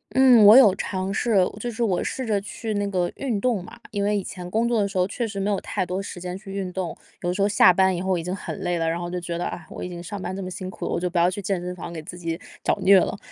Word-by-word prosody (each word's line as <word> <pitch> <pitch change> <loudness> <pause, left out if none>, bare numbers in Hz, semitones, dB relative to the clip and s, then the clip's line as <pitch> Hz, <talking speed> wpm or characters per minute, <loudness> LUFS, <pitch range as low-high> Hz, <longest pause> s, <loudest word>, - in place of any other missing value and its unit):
嗯， 260 -3 +7
我 210 +2 +10
有 250 -7 +8
尝 190 0 -3
试， 230 +1 0 0.2
就 240 - -3
是 235 0 -2
我 190 -6 +1
试 260 - -3
着 210 -3 +1
去 215 +2 -5
那 205 0 0
个 180 -3 -1
运 240 -7 -2
动 235 -5 +1
嘛。 - - -12
因 205 - -2
为 205 0 +2
以 200 - -2
前 180 -1 -7
工 225 +5 +1
作 235 -2 +2
的 200 - +1
时 195 -1 -5
候 180 - +3
确 225 +5 -3
实 205 -2 -7
没 195 +1 0
有 200 - +1
太 - - -2
多 180 +2 -3
时 195 - -7
间 180 0 -4
去 195 0 -13
运 195 -2 -3
动， 180 -2 -4 0.3
有 175 - 0
的 - - 0
时 200 - -2
候 200 - +4
下 195 -3 +6
班 190 +1 +3
以 175 - -3
后 190 -1 0
已 165 - -4
经 180 +2 -3
很 195 - -5
累 175 -1 -1
了， 165 -1 0
然 165 - -1
后 175 0 -4
就 180 0 -3
觉 170 -1 -4
得， 175 - -3
啊， 165 -3 -6
我 - - -7
已 - - -4
经 175 -1 -7
上 200 +4 -6
班 185 +1 -4
这 195 - -5
么 185 - -5
辛 185 0 -6
苦 220 - -7
了， - - -2
我 - - 0
就 180 +1 -1
不 175 - -3
要 170 +1 +5
去 185 +2 -5
健 195 -1 -1
身 180 +1 -5
房 170 -1 -7
给 165 -2 -6
自 175 +3 -9
己 165 -1 -4 0.2
找 - - +1
虐 195 +1 +7
了。 - - -2
190 Hz, 355 characters per minute, -24 LUFS, 180-205 Hz, 0.3 s, 我